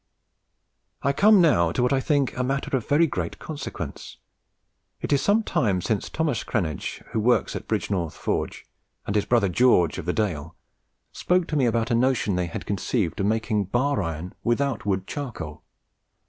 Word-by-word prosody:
"I 140 Hz, -, +2 dB
come 205 Hz, +6 st, +6 dB
now 85 Hz, -, +4 dB
to 125 Hz, -, +1 dB
what 125 Hz, -, +2 dB
I 135 Hz, -, +3 dB
think 140 Hz, -1 st, +1 dB
a 125 Hz, -, -1 dB
matter 135 Hz, +1 st, -1 dB
of 120 Hz, -5 st, -3 dB
very 150 Hz, +4 st, +5 dB
great 155 Hz, -, -3 dB
consequence. 135 Hz, -, -7 dB, 0.8 s
It -, -, -1 dB
is 140 Hz, -, +3 dB
some 215 Hz, +2 st, +3 dB
time 100 Hz, -, +1 dB
since 100 Hz, +3 st, -2 dB
Thos. 155 Hz, -6 st, -1 dB
Cranege, 85 Hz, -, -3 dB
who 110 Hz, -, 0 dB
works 120 Hz, +3 st, +2 dB
at -, -, -6 dB
Bridgenorth 100 Hz, -6 st, -1 dB
Forge, -, -, -3 dB, 0.4 s
and 100 Hz, -, -2 dB
his 105 Hz, -, +2 dB
brother 115 Hz, -5 st, +3 dB
George, 90 Hz, -4 st, +3 dB
of 85 Hz, -, -6 dB
the 90 Hz, -, +1 dB
Dale, 85 Hz, -6 st, -2 dB, 0.6 s
spoke 180 Hz, -1 st, +1 dB
to 155 Hz, -, -2 dB
me 135 Hz, -4 st, +3 dB
about 115 Hz, +1 st, 0 dB
a -, -, +3 dB
notion 120 Hz, -4 st, +2 dB
they 90 Hz, -1 st, 0 dB
had 85 Hz, -, -6 dB
conceived 100 Hz, -2 st, -1 dB
of 100 Hz, -, +1 dB
making 110 Hz, -1 st, 0 dB
bar 130 Hz, +6 st, +1 dB
iron 85 Hz, +1 st, -4 dB
without 120 Hz, -2 st, 0 dB
wood 95 Hz, -2 st, 0 dB
charcoal. 90 Hz, -, -6 dB
115 Hz, 175 wpm, -25 LUFS, 95-140 Hz, 0.8 s, come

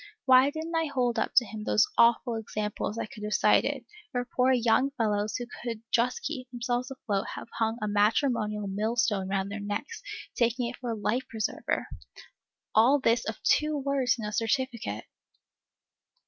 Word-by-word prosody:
Why 260 Hz, +1 st, +7 dB
did 315 Hz, +2 st, -5 dB
n't 335 Hz, 0 st, -4 dB
I 325 Hz, 0 st, +2 dB
hold 245 Hz, -4 st, 0 dB
up -, -, -2 dB
to 245 Hz, -, +6 dB
him 215 Hz, 0 st, -7 dB
those 215 Hz, +1 st, +4 dB
awful 235 Hz, +1 st, +4 dB
examples 210 Hz, -1 st, -3 dB
I -, -, -2 dB
could 215 Hz, 0 st, -12 dB
have 210 Hz, 0 st, -1 dB
cited, -, -, +3 dB, 0.3 s
where 245 Hz, -2 st, -1 dB
poor 255 Hz, +1 st, +2 dB
young 245 Hz, +2 st, +3 dB
fellows 210 Hz, -2 st, 0 dB
who 245 Hz, -, -3 dB, 0.2 s
could 230 Hz, -2 st, -5 dB
just 240 Hz, +1 st, +1 dB
keep 265 Hz, -4 st, -5 dB
themselves 245 Hz, +1 st, -2 dB
afloat 215 Hz, -7 st, -2 dB
have -, -, -8 dB
hung 225 Hz, 0 st, +1 dB
a -, -, 0 dB
matrimonial 210 Hz, 0 st, +1 dB
millstone 210 Hz, -1 st, 0 dB
round 195 Hz, 0 st, -1 dB
their 210 Hz, -, -4 dB
necks, 205 Hz, -, -4 dB, 0.3 s
taking 240 Hz, +1 st, +1 dB
it 245 Hz, -, -6 dB
for 245 Hz, -, -5 dB
a 230 Hz, -, -1 dB
life 235 Hz, +5 st, -1 dB
preserver? 220 Hz, -2 st, -2 dB, 0.9 s
All 245 Hz, +7 st, +5 dB
this 235 Hz, -2 st, +2 dB
of 220 Hz, -, -5 dB
two 300 Hz, 0 st, +2 dB
words 275 Hz, -3 st, +1 dB
in 220 Hz, -, -5 dB
a 210 Hz, -, -3 dB
certificate! 235 Hz, +2 st, -1 dB
235 Hz, 175 wpm, -28 LUFS, 215-255 Hz, 0.9 s, Why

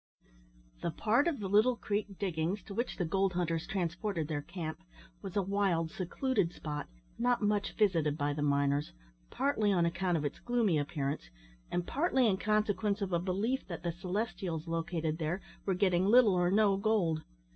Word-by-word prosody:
The -, -, -1 dB
part 230 Hz, -, +2 dB
of 320 Hz, -7 st, 0 dB
the 200 Hz, -, -3 dB
Little 215 Hz, +6 st, +4 dB
Creek 205 Hz, -3 st, -3 dB
diggings 180 Hz, 0 st, -1 dB
to 200 Hz, -, -9 dB
which 235 Hz, +5 st, -2 dB
the 180 Hz, -, 0 dB
gold 190 Hz, +3 st, +1 dB
hunters 165 Hz, -2 st, -1 dB
transported 180 Hz, -2 st, -2 dB
their 150 Hz, -2 st, -2 dB
camp, 165 Hz, -1 st, -6 dB, 0.4 s
was 195 Hz, -3 st, -7 dB
a 200 Hz, -, +2 dB
wild, 185 Hz, -4 st, +1 dB
secluded 190 Hz, +1 st, -1 dB
spot, 150 Hz, -1 st, -5 dB, 0.3 s
not 245 Hz, -1 st, +2 dB
much 205 Hz, -1 st, +1 dB
visited 165 Hz, -8 st, +2 dB
by 145 Hz, -1 st, 0 dB
the 145 Hz, -, -3 dB
miners, 140 Hz, 0 st, +1 dB, 0.4 s
partly 245 Hz, -7 st, +1 dB
on 175 Hz, -3 st, +3 dB
account 175 Hz, +1 st, 0 dB
of 150 Hz, -, -2 dB
its 145 Hz, -, -3 dB
gloomy 230 Hz, -10 st, +1 dB
appearance, 140 Hz, -, -3 dB, 0.4 s
and 175 Hz, 0 st, -1 dB
partly 270 Hz, -, +2 dB
in 200 Hz, -4 st, +3 dB
consequence 210 Hz, 0 st, +1 dB
of 195 Hz, -3 st, -2 dB
a 170 Hz, -, +3 dB
belief 200 Hz, +9 st, -1 dB
that 170 Hz, -4 st, -6 dB
the 170 Hz, -, 0 dB
Celestials 180 Hz, -2 st, -3 dB
located 165 Hz, -1 st, -2 dB
there 160 Hz, +3 st, -1 dB, 0.3 s
were 190 Hz, -, +2 dB
getting 185 Hz, -1 st, +2 dB
little 230 Hz, -2 st, +6 dB
or 180 Hz, -1 st, +2 dB
no 200 Hz, 0 st, +4 dB
gold. 195 Hz, -7 st, +1 dB
185 Hz, 175 wpm, -32 LUFS, 165-210 Hz, 0.4 s, little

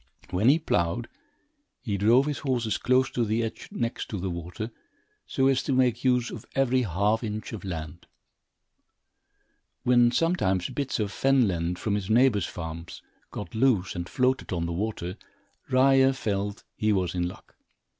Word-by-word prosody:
When 100 Hz, +7 st, +3 dB
he 145 Hz, -, +6 dB
ploughed, 115 Hz, -, 0 dB, 0.8 s
he 105 Hz, -5 st, -1 dB
drove 115 Hz, +7 st, +4 dB
his 150 Hz, -1 st, -2 dB
horses 120 Hz, -5 st, -1 dB
close 130 Hz, +2 st, +2 dB
to 120 Hz, -, 0 dB
the 110 Hz, +1 st, 0 dB
edge 115 Hz, -, -5 dB
next 115 Hz, 0 st, -3 dB
to 110 Hz, -, -3 dB
the 95 Hz, 0 st, -2 dB
water, 90 Hz, +7 st, -6 dB, 0.6 s
so 135 Hz, -, +1 dB
as 135 Hz, -1 st, +3 dB
to 140 Hz, -, -1 dB
make 125 Hz, -2 st, +2 dB
use 125 Hz, -2 st, +2 dB
of 115 Hz, -, -7 dB
every 130 Hz, -1 st, +3 dB
half 105 Hz, +2 st, +1 dB
inch 110 Hz, +1 st, -4 dB
of 110 Hz, -, -6 dB
land. 80 Hz, -5 st, -6 dB, 1.8 s
When 120 Hz, -1 st, +5 dB
sometimes 120 Hz, -, +1 dB
bits 140 Hz, -4 st, -2 dB
of 105 Hz, -2 st, -1 dB
fen 135 Hz, -1 st, +3 dB
land, 85 Hz, -1 st, -1 dB
from 105 Hz, +2 st, -2 dB
his 100 Hz, -1 st, -2 dB
neighbor's 110 Hz, -5 st, +4 dB
farms, 80 Hz, 0 st, -7 dB, 0.3 s
got 105 Hz, -, -7 dB
loose 110 Hz, -5 st, +2 dB
and 85 Hz, 0 st, -4 dB
floated 130 Hz, 0 st, 0 dB
on 85 Hz, -2 st, -1 dB
the 85 Hz, -, -3 dB
water, 95 Hz, -1 st, -3 dB, 0.5 s
Ryer 135 Hz, +1 st, +5 dB
felt 100 Hz, -4 st, -3 dB
he 110 Hz, 0 st, +1 dB
was 95 Hz, -4 st, 0 dB
in 90 Hz, -1 st, 0 dB
luck. 90 Hz, -, -12 dB
110 Hz, 165 wpm, -27 LUFS, 95-130 Hz, 1.8 s, he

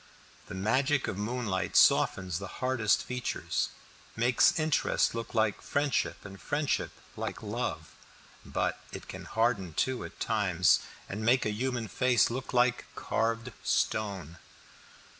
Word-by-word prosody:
The -, -, -7 dB
magic 130 Hz, +8 st, +1 dB
of -, -, -2 dB
moonlight 105 Hz, -5 st, -2 dB
softens 90 Hz, -2 st, +4 dB
the 100 Hz, -, -6 dB
hardest 130 Hz, -5 st, +2 dB
features, 125 Hz, -1 st, -2 dB, 0.5 s
makes 120 Hz, +6 st, +4 dB
interest 155 Hz, -2 st, +2 dB
look 115 Hz, 0 st, -5 dB
like 110 Hz, -2 st, +1 dB
friendship, 145 Hz, -6 st, -1 dB
and 95 Hz, -1 st, -10 dB
friendship 145 Hz, 0 st, 0 dB, 0.3 s
like -, -, -5 dB
love; -, -, -4 dB, 0.5 s
but -, -, -1 dB
it -, -, -8 dB
can -, -, -8 dB
harden 110 Hz, -8 st, 0 dB
too 130 Hz, -1 st, 0 dB
at -, -, -10 dB
times, 95 Hz, -6 st, +3 dB, 0.3 s
and 105 Hz, +3 st, -5 dB
make 120 Hz, +3 st, +3 dB
a 105 Hz, -, +1 dB
human 120 Hz, +1 st, -2 dB
face 125 Hz, -1 st, +3 dB
look 130 Hz, +2 st, -4 dB
like 120 Hz, -1 st, +2 dB
carved 115 Hz, +2 st, -1 dB
stone. 95 Hz, -7 st, -1 dB
115 Hz, 130 wpm, -30 LUFS, 100-125 Hz, 0.5 s, softens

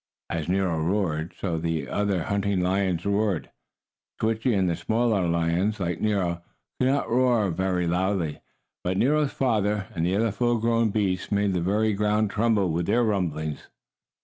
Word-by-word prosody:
As 80 Hz, -1 st, -3 dB
Nero 90 Hz, -3 st, +1 dB
roared, 85 Hz, -2 st, -1 dB
so 85 Hz, -4 st, -2 dB
the 80 Hz, -4 st, -2 dB
other 100 Hz, -2 st, 0 dB
hunting 100 Hz, 0 st, 0 dB
lions 90 Hz, -1 st, 0 dB
roared. 100 Hz, -4 st, 0 dB, 0.7 s
Switchie 110 Hz, +1 st, +1 dB
and 95 Hz, -1 st, +2 dB
the 85 Hz, -, 0 dB
smaller 110 Hz, +1 st, +1 dB
lions, 85 Hz, +5 st, 0 dB
like 85 Hz, -3 st, -2 dB
Nero, 95 Hz, -5 st, 0 dB, 0.4 s
could 130 Hz, -, +3 dB
not 140 Hz, +2 st, +1 dB
roar 120 Hz, -5 st, +2 dB
very 90 Hz, +1 st, 0 dB
loudly, 90 Hz, -2 st, -1 dB, 0.4 s
but 90 Hz, +1 st, -1 dB
Nero's 145 Hz, +4 st, +2 dB
father, 105 Hz, -5 st, 0 dB
and 80 Hz, -, -2 dB
the 90 Hz, +3 st, +1 dB
other 110 Hz, +1 st, +1 dB
full 120 Hz, +3 st, +1 dB
grown 115 Hz, 0 st, +2 dB
beasts 100 Hz, -3 st, -1 dB
made 100 Hz, -1 st, +1 dB
the 90 Hz, -, 0 dB
very 105 Hz, +4 st, +1 dB
ground 105 Hz, +1 st, +1 dB
tremble 105 Hz, -5 st, +1 dB
with 85 Hz, +2 st, -1 dB
their 120 Hz, +1 st, +3 dB
rumblings. 80 Hz, -8 st, -2 dB
100 Hz, 160 wpm, -25 LUFS, 85-110 Hz, 0.7 s, could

